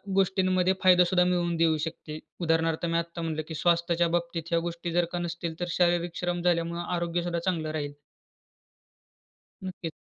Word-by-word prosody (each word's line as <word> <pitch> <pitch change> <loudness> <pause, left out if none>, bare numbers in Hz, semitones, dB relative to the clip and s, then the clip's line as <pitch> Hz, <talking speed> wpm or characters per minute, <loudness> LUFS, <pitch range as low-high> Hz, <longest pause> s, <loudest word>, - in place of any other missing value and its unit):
गोष्टींमध्ये 190 -1 +2
फायदा 180 -1 +7
सुद्धा 180 0 +3
मिळवून 175 -1 +1
देऊ 160 -1 +3
शकते. 155 -1 -7 0.2
उदाहरणार्थ 165 0 +1
मी 165 0 0
आत्ता 170 0 -5
म्हटलं, 160 -1 -2
की 160 - -6
स्वास्थ्याच्या 170 +1 +2
बाबतीत 170 -1 -4
ह्या 170 - +3
गोष्टी 170 0 -5
जर 175 0 +3
का 175 - -1
नसतील, 170 -1 -4
तर 175 - -1
शारीरिक 175 -1 +2
श्रम 175 -1 -1
झाल्यामुळं 170 -1 0
आरोग्य 170 0 -1
सुद्धा 170 -1 -1
चांगलं 165 -3 -1
राहील. 145 -2 -3 1.7
नक्कीच. 180 -3 -5
170 Hz, 160 wpm, -28 LUFS, 165-175 Hz, 1.7 s, फायदा